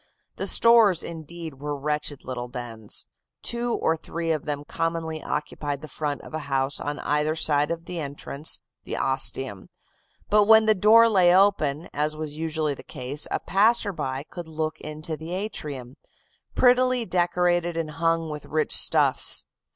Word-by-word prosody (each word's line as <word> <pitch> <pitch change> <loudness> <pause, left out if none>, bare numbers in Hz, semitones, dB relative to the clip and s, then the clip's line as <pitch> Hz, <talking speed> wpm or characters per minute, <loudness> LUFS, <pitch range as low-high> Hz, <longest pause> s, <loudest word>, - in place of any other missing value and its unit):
The - - -1
stores, 230 -7 +6
indeed, 165 -2 -8
were 145 0 -4
wretched 150 0 -3
little 125 -1 -5
dens. 115 -3 -4 0.4
Two 235 0 -1
or 160 - +1
three 165 +1 -4
of 155 -3 -2
them 145 -1 -4
commonly 165 -1 -3
occupied 150 -1 -4
the - - -6
front 145 0 -4
of - - -12
a 155 - -2
house 135 0 0
on 145 0 -4
either 150 +1 0
side 150 -2 +2
of 165 0 -4
the 175 -1 -5
entrance, 145 +1 -3 0.2
the - - -5
ostium; 130 -5 -1 0.6
but 210 0 +4
when 220 +1 +7
the 215 - +5
door 220 +3 +6
lay 180 -5 +4
open, 175 -6 +2
as 150 +1 -1
was 155 -1 -5
usually 155 -1 -2
the - - -10
case, 130 +4 -5
a - - -1
passerby 195 - +1
could 175 -2 -8
look 155 -1 -4
into 155 +1 -6
the 160 +3 -7
atrium, 145 - -6 0.6
prettily 250 -1 +3
decorated 175 -2 +1
and 160 -2 -3
hung 165 +1 0
with 150 -1 -7
rich 155 0 0
stuffs. - - +3
155 Hz, 160 wpm, -25 LUFS, 145-175 Hz, 0.6 s, when